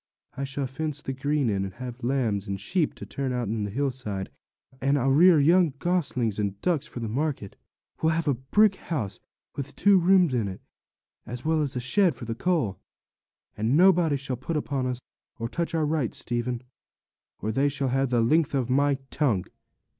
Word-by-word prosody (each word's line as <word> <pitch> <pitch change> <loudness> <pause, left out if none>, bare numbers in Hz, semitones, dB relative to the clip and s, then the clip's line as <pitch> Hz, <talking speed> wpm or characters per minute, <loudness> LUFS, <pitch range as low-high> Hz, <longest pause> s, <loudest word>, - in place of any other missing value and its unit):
'I 140 - -4
shall 135 +1 -3
fence 145 +3 -3
the 135 - -4
green 140 0 0
in, 100 -3 0
and 95 -1 -6
have 125 -1 -8
lambs 115 -6 0
and 100 0 -3
sheep 160 - 0
to - - -8
turn 135 -2 -3
out 125 -4 -2
on 110 -1 -1
the - - -4
hillside, 120 -5 -3 0.5
and 140 +2 +2
I'll 135 0 +2
rear 165 +3 +6
young 165 0 +4
goslings 135 - 0
and 100 -1 -2
ducks 160 -5 0
for 120 - -7
market; 120 -1 -2
and - - -27 0.4
we'll 160 0 +3
have 165 0 -1
a 145 - +4
brick 190 - +3
house, 110 - -4 0.4
with 140 0 -6
two 200 -2 +5
rooms 180 -4 +4
in 115 -5 0
it, 95 -1 -6 0.7
as 120 +3 -7
well 160 0 +2
as 140 -2 -2
a - - 0
shed 165 +6 +2
for 120 - -8
the 115 - -3
coal. 120 - 0 0.8
And 115 +7 +1
nobody 175 -5 +5
shall 135 -2 -4
put 155 +6 -3
upon 140 -3 -1
us, 125 -1 -3 0.4
or 115 - -3
touch 170 +6 -2
our 160 -2 +2
rights, 150 -6 -1
Stephen, 120 0 -1 0.7
or 110 - -3
they 135 +5 +2
shall 140 -1 -1
have 135 +1 +1
the 120 -2 +2
length 145 +5 +2
of 130 -2 0
my 140 +1 +3 0.2
tongue.' 120 -12 +1
135 Hz, 195 wpm, -26 LUFS, 120-155 Hz, 0.8 s, rear